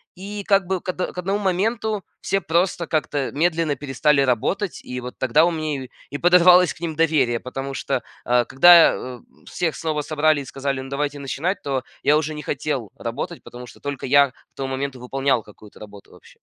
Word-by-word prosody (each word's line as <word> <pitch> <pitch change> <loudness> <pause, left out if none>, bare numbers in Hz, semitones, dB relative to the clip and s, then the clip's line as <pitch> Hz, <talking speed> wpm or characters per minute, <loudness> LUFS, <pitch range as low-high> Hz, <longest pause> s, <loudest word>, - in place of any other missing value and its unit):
И, 200 +2 -7
как 195 -2 +3
бы, 190 +1 -1
к - - -7
од 185 - -3 0.2
к - - -19
одному 195 +3 -1
моменту 210 +2 -1 0.2
все 195 - 0
просто 170 0 0
как-то 145 -3 -1
медленно 160 -1 +1
перестали 140 +1 +1
работать. 140 - 0
И 125 0 -6
вот 125 0 -8
тогда 130 +5 +3
у 175 - +1
меня 155 -4 -3
и 130 - -11 0.2
и 145 - -4
подорвалось 180 +1 +6
к - - -19
ним 165 -2 -4
доверие, 150 -7 +2
потому 135 +2 -6
что, - - -2 0.2
э, 120 0 +3
когда, 170 +6 +7
э, 125 -1 -7 0.3
всех 165 -3 -2
снова 155 -2 -2
собрали 155 0 +1
и - - -9
сказали: 135 0 -3
"Ну, 135 - -9
давайте 145 +1 -2
начинать", 145 +7 -2
то 135 -2 -2 0.2
я 145 - +4
уже 155 0 -2
не 150 - -6
хотел 135 -7 -3
работать, - - -5
потому 125 0 -10
что - - -15
только 145 -1 -5
я 140 0 +5
к - - -37 0.2
тому 135 -1 -4
моменту 130 -1 -4
выполнял 135 -1 0
какую-то 105 0 -16
работу 105 -1 -13
вообще. - - -19
145 Hz, 200 wpm, -22 LUFS, 135-175 Hz, 0.3 s, когда